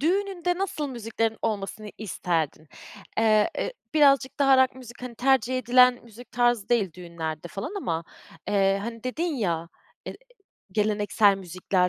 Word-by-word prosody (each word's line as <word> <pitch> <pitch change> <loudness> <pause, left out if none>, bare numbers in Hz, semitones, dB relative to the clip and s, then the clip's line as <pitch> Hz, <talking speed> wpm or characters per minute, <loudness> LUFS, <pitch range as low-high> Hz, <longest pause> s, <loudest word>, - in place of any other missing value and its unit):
Düğününde 355 +1 0
nasıl 360 -7 -2
müziklerin 225 -2 -2
olmasını 210 -1 -3
isterdin? 165 -7 -2 0.5
Eee, 215 -1 +4
ı - - -2 0.2
birazcık 275 -2 +4
daha 275 -1 +5
rock 260 - 0
müzik 250 -2 -12
hani 250 -2 -6
tercih 255 0 +2
edilen 250 0 +5
müzik 235 +1 -14
tarzı 240 -4 +2
değil 215 -8 +1
düğünlerde 170 -2 -6
falan 200 - -6
ama, 165 - -2 0.4
eee, 195 -1 +3
hani 230 +1 -7
dedin 255 +7 -2
ya, 170 - -1 0.4
e - - -3
ı - - -9 0.6
geleneksel 205 -1 +3
müzikler 185 0 0
225 Hz, 140 wpm, -26 LUFS, 195-260 Hz, 0.6 s, daha